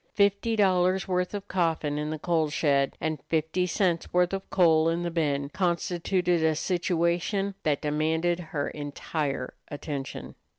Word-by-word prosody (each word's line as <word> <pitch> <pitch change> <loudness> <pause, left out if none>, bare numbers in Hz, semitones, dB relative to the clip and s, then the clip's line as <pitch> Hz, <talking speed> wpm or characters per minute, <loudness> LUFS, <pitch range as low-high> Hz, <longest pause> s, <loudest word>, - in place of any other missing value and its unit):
Fifty 200 +3 +2
dollars' 185 -2 +2
worth 180 +1 -1
of 200 0 -6
coffin 160 -5 0
in 150 0 -2
the 155 - -3
coal 160 -1 +1
shed 140 -2 +1
and 155 -2 -2
fifty 160 +3 0
cents' 175 -1 0
worth 180 +1 +2
of 195 0 -4
coal 165 -3 +4
in 170 +1 -1
the 170 - -2
bin 145 -4 0
constituted 175 0 0
a 160 -1 +3
situation 180 +3 0
that 150 -1 0
demanded 160 +3 +1
her 145 -2 -2
entire 145 -2 -4
attention. 145 -2 -6
170 Hz, 145 wpm, -27 LUFS, 155-180 Hz, -, coal